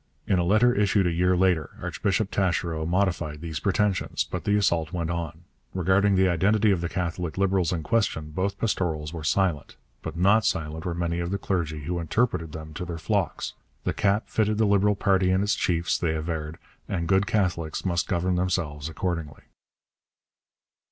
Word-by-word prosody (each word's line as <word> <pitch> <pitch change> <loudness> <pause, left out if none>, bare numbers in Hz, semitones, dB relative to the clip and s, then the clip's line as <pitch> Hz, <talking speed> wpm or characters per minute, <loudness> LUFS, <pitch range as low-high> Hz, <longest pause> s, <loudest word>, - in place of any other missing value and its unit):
In 95 - +2
a - - +2
letter 110 +7 +4
issued 100 -2 +2
a 90 - +2
year 90 +2 +2
later 90 -5 +1
Archbishop 100 +1 -1
Taschereau 85 -4 0
modified 85 -4 0
these 80 -2 -5
pretensions, 100 0 0
but - - -6
the 105 - +2
assault 85 -6 +1
went 85 -2 -2
on. 85 -1 -4 0.3
Regarding 95 +2 +3
the 95 0 +4
identity 100 +5 +3
of 90 -3 +1
the 85 - -2
Catholic 90 -2 -3
Liberals 95 -2 +2
in 85 -3 -2
question 80 -6 0
both 95 +5 -2
pastorals 80 -8 -1
were 80 -2 -6
silent, 85 -1 0 0.3
but - - -6
not 100 +5 +4
silent 80 -3 -2
were 85 -2 -2
many 85 0 -1
of 85 0 -2
the 100 - -1
clergy 80 -6 -2
who 85 +4 -3
interpreted 85 -1 0
them 80 0 -8
to 85 - -5
their 85 -1 -5
flocks. 80 - -1 0.3
The - - -1
cap 100 +2 +1
fitted 110 -1 +1
the 110 - +3
Liberal 100 0 +3
party 95 -2 +2
and 95 +1 +2
its 105 - +1
chiefs, 85 -1 0
they 80 -3 0
averred, 80 0 -4 0.3
and 85 -3 -2
good 95 +2 +3
Catholics 90 -6 -1
must 90 0 0
govern 90 0 0
themselves 80 -5 -1
accordingly. 80 -4 -4
90 Hz, 180 wpm, -26 LUFS, 80-100 Hz, 0.3 s, letter